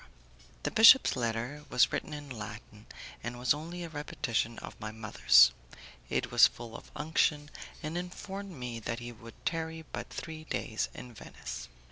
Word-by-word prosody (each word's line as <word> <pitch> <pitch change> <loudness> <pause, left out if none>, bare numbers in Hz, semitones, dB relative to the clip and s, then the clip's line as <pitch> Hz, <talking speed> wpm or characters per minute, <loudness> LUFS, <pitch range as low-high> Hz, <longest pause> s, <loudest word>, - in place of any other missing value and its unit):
The - - -1
bishop's 230 +4 +8
letter 120 +4 -2
was 125 - +4
written - - -2
in 145 -1 -6
Latin, 105 -3 -9 0.4
and 120 +2 -4
was 125 +1 +3
only 170 +4 -6
a 170 - -6
repetition 120 -6 -2
of - - -9
my 110 -1 -4
mother's. 60 - +6 0.6
It - - -1
was - - +8
full 115 -1 -10
of - - -10
unction, 150 -1 +1 0.3
and 155 +2 -3
informed 190 +3 -5
me 125 -8 -6
that 115 +1 -3
he 120 0 -6
would 115 0 -13
tarry 160 -1 -2
but - - -5
three 160 -1 -7
days 110 -7 -2
in 125 -1 -9
Venice. - - -8
125 Hz, 160 wpm, -31 LUFS, 115-160 Hz, 0.6 s, bishop's